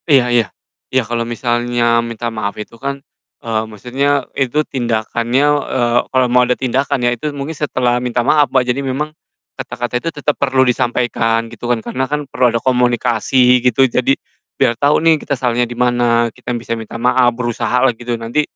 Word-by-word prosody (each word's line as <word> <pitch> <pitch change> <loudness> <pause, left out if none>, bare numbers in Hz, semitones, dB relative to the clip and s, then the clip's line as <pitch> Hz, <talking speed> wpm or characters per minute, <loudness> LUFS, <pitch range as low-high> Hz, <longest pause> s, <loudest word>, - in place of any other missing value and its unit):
Iya 125 -4 +4
iya, 120 -2 +4 0.4
iya 130 -1 +1
kalo 115 +1 -2
misalnya 120 0 +1
minta 115 0 -4
maaf 100 -2 -3
itu 105 +2 -8
kan, 140 0 -3 0.5
eee, 110 -1 0
maksudnya 135 +7 -1
itu 140 +3 0
tindakannya 120 +1 0 0.3
eee, 120 -1 +2
kalo 130 -1 +2
mau 125 0 +3
ada 125 0 +1
tindakan 135 +1 0
ya 120 - +3
itu 120 +6 -4
mungkin 140 +3 -4
setelah 125 -5 0
minta 120 -1 -1
maaf 145 -1 +4
Mbak, 130 0 +2
jadi 125 +2 -1
memang, 140 +3 -3 0.4
kata-kata 120 0 -4
itu 165 - -2
tetep 150 -1 -1
perlu 130 -1 +3
disampaikan 120 -2 0
gitu 120 +1 -6
kan, 120 -2 0
karena 130 +1 -2
kan 150 0 -2
perlu 130 -2 +1
ada 115 - 0
komunikasi 125 +1 +2
gitu 130 +2 +3
jadi, 125 +2 +1 0.4
biar 115 - +3
tau 145 +5 +2
nih 160 -1 +3
kita 140 -2 -2
salahnya 120 -1 0
di 120 - -7
mana 120 -2 +2
kita - - -10
bisa 115 0 -4
minta 115 0 -6
maaf 125 +1 +3
berusaha 125 +1 0
lah 130 - +3
gitu 120 +1 -4
nanti, 115 +6 0
125 Hz, 180 wpm, -16 LUFS, 120-130 Hz, 0.5 s, Iya